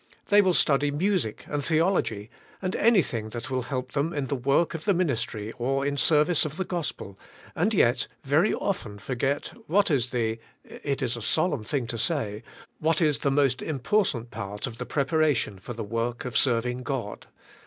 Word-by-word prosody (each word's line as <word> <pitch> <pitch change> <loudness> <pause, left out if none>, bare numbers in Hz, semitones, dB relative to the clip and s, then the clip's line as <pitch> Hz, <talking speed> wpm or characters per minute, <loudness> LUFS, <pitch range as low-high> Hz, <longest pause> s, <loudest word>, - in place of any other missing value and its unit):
They 205 0 +7
will 185 -3 +2
study 145 -1 +3
music 160 - -1
and 145 -1 -2
theolog 165 +6 +2
y 105 0 -8 0.3
and 185 0 -2
anything 165 - +2
that 120 +2 -6
will 130 -1 0
help 130 0 -4
them 150 +4 -1
in 145 -2 -1
the 140 - -2
work 140 +6 +2
of 165 -2 -6
the 200 -3 +3
ministry 115 - -1
or 135 +3 0
in 140 0 0
service 150 +4 +3
of 155 +1 -4
the 190 - -1
gospel 145 - -5 0.4
and - - +2
yet - - +3 0.2
very - - +3
often 105 - -2
forget 135 +6 -2
what 195 +2 +3
is 125 -4 +2
the 115 -2 -1 0.2
— - - -36
it 140 -1 -4
is 120 -1 0
a 120 - -6
solemn 155 +1 +1
thing 130 +2 -1
to 115 0 -4
say 110 -9 -1 0.2
— - - -25
what 160 0 +2
is 150 -4 +2
the 140 - +1
most 135 -2 +2
important 135 - 0
part 105 -1 -5
of 115 -3 -7
the - - -5
preparation 140 - +1
for 120 +6 -7
the 115 - -5
work 115 +4 -2
of 125 - -5
serving 125 -1 +2
God. 125 -4 -4
135 Hz, 195 wpm, -27 LUFS, 115-155 Hz, 0.4 s, They